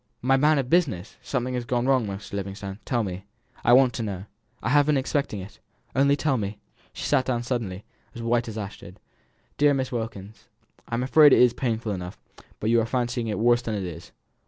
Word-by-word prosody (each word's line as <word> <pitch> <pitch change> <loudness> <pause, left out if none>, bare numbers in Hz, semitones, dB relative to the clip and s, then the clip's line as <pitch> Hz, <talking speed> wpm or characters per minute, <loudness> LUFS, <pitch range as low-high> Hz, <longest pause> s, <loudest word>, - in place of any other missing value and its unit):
"My 135 +1 +4
man 150 +3 +4
of 135 -3 0
business! 130 - 0
Something 125 -1 -2
has 125 -1 -2
gone 120 +1 -1
wrong, 130 -4 +2
Mr. 100 +1 -7
Livingstone. 100 0 -5
Tell 120 -3 0
me 95 -1 -5 0.4
I - - +4
want 130 -1 +6
to 130 - -4
know. 100 -3 -4 0.4
I - - 0
have 145 +2 +4
been 150 -2 +3
expecting 135 -6 -1
it 95 +2 -12 0.4
only 140 +2 +4
tell 145 -2 0
me." 100 0 -4 0.3
She - - -6
sat 140 -3 +3
down 120 -2 -1
suddenly, 110 -6 -3 0.3
as 115 - -6
white 120 0 +1
as 110 -1 -6
ashes. 100 -2 -7 0.6
"Dear 145 -1 +5
Miss 130 0 -2
Wilkins, 110 -3 -6 0.4
I'm 120 +2 -1
afraid 145 +3 +7
it - - +6
is 125 -1 +6
painful 115 -3 -2
enough, 90 -1 -5 0.4
but 110 - 0
you 115 0 +4
are - - -1
fancying 120 -1 -1
it 105 - -2
worse 120 +2 +3
than 115 -3 -3
it 100 - -3
is. 85 -2 -8
120 Hz, 205 wpm, -25 LUFS, 105-130 Hz, 0.6 s, afraid